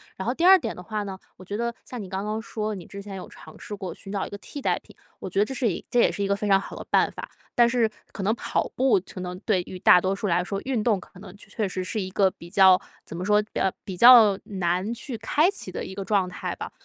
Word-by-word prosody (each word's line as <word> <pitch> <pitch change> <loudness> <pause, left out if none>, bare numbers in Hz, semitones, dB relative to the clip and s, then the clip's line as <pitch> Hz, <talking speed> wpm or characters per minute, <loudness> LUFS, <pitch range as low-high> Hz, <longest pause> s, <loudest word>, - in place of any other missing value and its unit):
然 190 - -6
后 245 - +1
第 330 - -3
2 380 +1 +9
点 230 -10 -4
的 180 - -9
话 210 +3 -4
呢， 195 -2 -6 0.2
我 185 - -13
觉 200 +3 -5
得 235 0 -2
像 250 -3 -7
你 195 - -7
刚 190 +1 -3
刚 215 +1 -2
说， 215 -1 -4
你 180 -4 -9
之 200 - -8
前 200 -1 -8
有 185 - -8
尝 - - -14
试 210 - -7
过 190 -4 -6
寻 195 - -10
找 200 -2 -2
一 - - -8
个 200 - -7
替 285 - -8
代 - - +1
品， - - -19 0.2
我 - - -6
觉 190 - -6
得 205 - +4
这 265 - -5
是 245 -3 +1
一 - - -6
这 245 - +3
也 - - +4
是 200 - -3
一 - - 0
个 200 - +2
非 210 +1 -3
常 195 -1 +5
好 - - -8
的 - - -8
办 - - +3
法。 - - -8 0.3
但 240 -1 +6
是 235 -2 +2 0.2
可 - - -7
能 215 +4 +1
跑 - - -2
步 250 -7 +3
可 185 - -6
能 180 0 -5
对 190 -4 +2
于 185 +1 -9
大 180 - +7
多 190 +1 0
数 205 - -3
来 175 -1 +2
说， 195 +1 -3
运 250 -5 -1
动 210 -5 +2
可 180 - -15
能 185 -2 -11
确 - - -14
确 215 -3 -2
实 185 0 -3
是 215 - -3
一 185 - -4
个 195 0 +3
比 170 - -13
较 190 -1 +6 0.3
怎 - - -8
么 175 - -4
说， 210 +1 +4
比 210 - -13
较 190 - +2
比 190 - -5
较 230 -3 +8
难 185 +2 -1
去 240 0 -6
开 300 - +2
启 385 - -7
的 - - -5
一 190 - -8
个 195 - -4
状 195 -2 +1
态 180 - -5
吧， - - -6
200 Hz, 320 characters per minute, -25 LUFS, 185-225 Hz, 0.3 s, 2